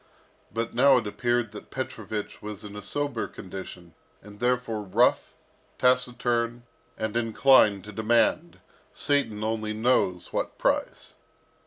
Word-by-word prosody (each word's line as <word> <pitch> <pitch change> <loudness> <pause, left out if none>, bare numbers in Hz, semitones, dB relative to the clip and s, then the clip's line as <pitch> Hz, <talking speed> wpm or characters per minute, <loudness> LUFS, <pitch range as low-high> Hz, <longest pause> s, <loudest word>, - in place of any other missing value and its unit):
But 115 +2 -3
now 135 +2 +6
it 120 - -1
appeared 120 +1 -1
that 105 - -10
Petrovich 110 -5 -5
was 105 -1 -7
in 105 0 -9
a 105 - -6
sober 140 +2 -2
condition, 90 -2 -9 0.3
and 105 0 -13
therefore 120 -3 0
rough, 95 -3 +2 0.4
taciturn, 120 -2 +1 0.3
and 110 0 -3
inclined 115 -3 +4
to 105 - -9
demand, 120 - +1 0.3
Satan 135 -8 0
only 110 -1 -2
knows 110 -6 +1
what - - -2
price. - - -1
115 Hz, 125 wpm, -26 LUFS, 105-125 Hz, 0.4 s, now